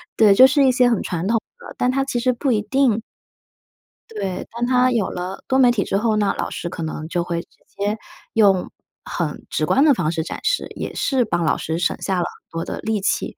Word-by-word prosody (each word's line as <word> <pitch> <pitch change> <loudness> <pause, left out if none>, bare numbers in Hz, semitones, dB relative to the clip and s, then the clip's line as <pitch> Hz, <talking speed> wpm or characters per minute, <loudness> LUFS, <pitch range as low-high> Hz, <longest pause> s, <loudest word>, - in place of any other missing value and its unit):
对， 210 -3 +6
就 260 +6 +8
是 275 +1 +3
一 260 - +5
些 250 -1 +4
很 230 - +1
传 175 +1 -3
统 230 +2 +2 0.2
的， - - -11
但 250 - +2
它 270 +1 0
其 245 -3 -2
实 255 +1 +2
不 265 +3 -1
一 210 - +1
定 245 -2 +1 1.1
对， 195 -4 -4
当 235 +1 -2
他 250 0 +3
有 230 -5 0
了 180 +2 -6
多 265 - +2
媒 250 -2 +6
体 210 -5 0
之 195 - -1
后 220 0 +1
呢， 205 -2 +2
老 - - -2
师 170 - -5
可 165 - -6
能 155 0 -5
就 175 0 -1
会 170 -1 -3
直 - - -21 0.2
接 205 +2 -3 0.4
用 195 -4 +3 0.3
很 - - -4
直 - - 0
观 275 - +3
的 290 - +6
方 170 -8 0
式 160 -1 -2
展 - - -6
示， - - 0
也 - - -5
是 260 -3 +1
帮 175 -5 -1
老 150 - +2
师 160 +1 -3
省 180 - 0
下 190 -2 -1
了 - - +1
很 - - -11
多 165 0 -4
的 - - -5
力 220 -1 -1
气。 195 - -1
215 Hz, 255 characters per minute, -21 LUFS, 180-250 Hz, 1.1 s, 就